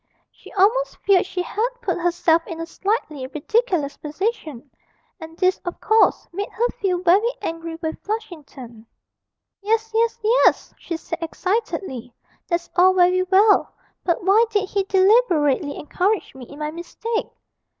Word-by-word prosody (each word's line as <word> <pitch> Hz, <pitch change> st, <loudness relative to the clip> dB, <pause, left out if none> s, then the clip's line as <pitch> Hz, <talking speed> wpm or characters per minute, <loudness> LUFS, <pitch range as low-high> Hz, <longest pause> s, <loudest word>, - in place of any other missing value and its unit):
She -, -, -16 dB
almost 445 Hz, +6 st, +2 dB
feared 380 Hz, -2 st, +4 dB
she 365 Hz, -1 st, -3 dB
had 440 Hz, +6 st, -1 dB
put 390 Hz, -8 st, -2 dB
herself 335 Hz, -1 st, +1 dB
in 330 Hz, -, -7 dB
a 330 Hz, -, -3 dB
slightly 330 Hz, -, -3 dB
ridiculous 305 Hz, -, -1 dB
position, 305 Hz, -, -4 dB, 0.5 s
and 325 Hz, 0 st, -11 dB
this, 370 Hz, 0 st, +2 dB
of 350 Hz, -, -7 dB
course, 440 Hz, 0 st, +3 dB
made 400 Hz, +3 st, -4 dB
her 475 Hz, +2 st, 0 dB
feel 365 Hz, -5 st, -2 dB
very 385 Hz, +6 st, +4 dB
angry 330 Hz, 0 st, -5 dB
with 320 Hz, 0 st, -4 dB
Flushington. 290 Hz, -, -7 dB, 0.7 s
'Yes, 445 Hz, +2 st, 0 dB
yes, 460 Hz, +1 st, +1 dB
yes!' 460 Hz, +4 st, +3 dB
she 335 Hz, -, -5 dB
said 335 Hz, +1 st, -6 dB
excitedly, 330 Hz, -, -3 dB, 0.4 s
'that's 345 Hz, -1 st, -2 dB
all 370 Hz, +1 st, +5 dB
very 365 Hz, 0 st, +4 dB
well; 395 Hz, +3 st, +3 dB, 0.3 s
but 345 Hz, 0 st, 0 dB
why 400 Hz, +5 st, +5 dB
did 410 Hz, -3 st, 0 dB
he 400 Hz, -1 st, +1 dB
deliberately 375 Hz, -, +3 dB
encourage 380 Hz, +7 st, -1 dB
me 260 Hz, -2 st, -10 dB
in 285 Hz, -, -13 dB
my 300 Hz, 0 st, -3 dB
mistake?' 435 Hz, +7 st, -4 dB
365 Hz, 145 wpm, -22 LUFS, 320-420 Hz, 0.7 s, all